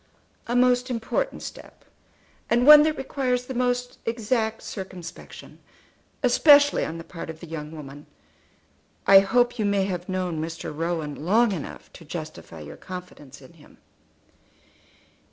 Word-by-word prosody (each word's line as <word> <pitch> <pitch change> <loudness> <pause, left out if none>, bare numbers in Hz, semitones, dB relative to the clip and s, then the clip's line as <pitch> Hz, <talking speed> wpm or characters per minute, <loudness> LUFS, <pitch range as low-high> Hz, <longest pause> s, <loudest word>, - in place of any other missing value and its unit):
"A 240 - -1
most 250 +1 +3
important 245 - -2
step, - - -11 0.6
and 240 +1 +3
one 300 +1 +11
that 310 0 +1
requires 255 -2 -2
the 260 - -6
most 245 0 -1
exact 225 -1 -1
circumspection, 185 -4 -9 0.6
especially 285 +3 +5
on 165 - -4
the 165 - -8
part 165 -1 -9
of 160 -1 -8
the - - -9
young 155 -2 -7
woman. 145 -2 -10 1.0
I 195 0 +9
hope 245 +4 +1
you 215 - +1
may 200 -1 +1
have 180 -1 -4
known 180 -4 -2
Mr. 160 -1 -6
Rowan 160 -3 -3
long 220 +6 +3
enough 175 -7 -7
to 170 - -13
justify 155 - -8
your 75 - -10
confidence 150 -7 -10
in 130 - -16
him." - - -19
195 Hz, 140 wpm, -25 LUFS, 165-245 Hz, 1.0 s, one